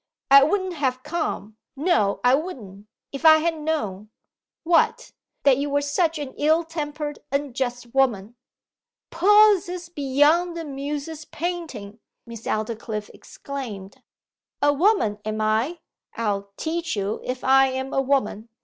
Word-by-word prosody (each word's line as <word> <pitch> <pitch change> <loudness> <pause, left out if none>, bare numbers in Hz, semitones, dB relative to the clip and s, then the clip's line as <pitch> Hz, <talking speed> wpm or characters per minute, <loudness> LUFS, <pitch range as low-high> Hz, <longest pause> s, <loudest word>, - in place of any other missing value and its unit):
'I 275 0 +9
wouldn't 375 +3 -1
have 260 -5 -2
come 295 -9 -4 0.2
no 280 - +1
I 245 +1 +5
wouldn't! 225 - -4 0.2
if 275 +2 -7
I 315 -1 +8
had 325 0 -1
known!' 215 -11 -3 0.5
'What?' 335 0 +2 0.3
'That 275 -2 +4
you 285 +1 -1
were 285 0 +1
such 325 +3 0
an 285 -3 -6
ill 315 +3 +3
tempered, 300 -2 -5
unjust 255 -4 -3
woman!' 240 -5 +1 0.8
'Possest 365 -2 +4
beyond 300 +5 +2
the 330 - -5
Muse's 290 +2 -5
painting,' 300 - -5 0.3
Miss 230 -2 -9
Aldclyffe 215 -1 -3
exclaimed 220 -9 -8 0.6
'A 290 0 +5
Woman, 290 - +2
am 215 0 -3
I! 220 +10 0 0.4
I'll 200 -3 -2
teach 335 -1 -2
you 200 +1 -2
if 255 0 -4
I 270 +1 +5
am 265 +1 -4
a 270 - +2
Woman! 245 -5 -1
280 Hz, 130 wpm, -23 LUFS, 230-320 Hz, 0.8 s, I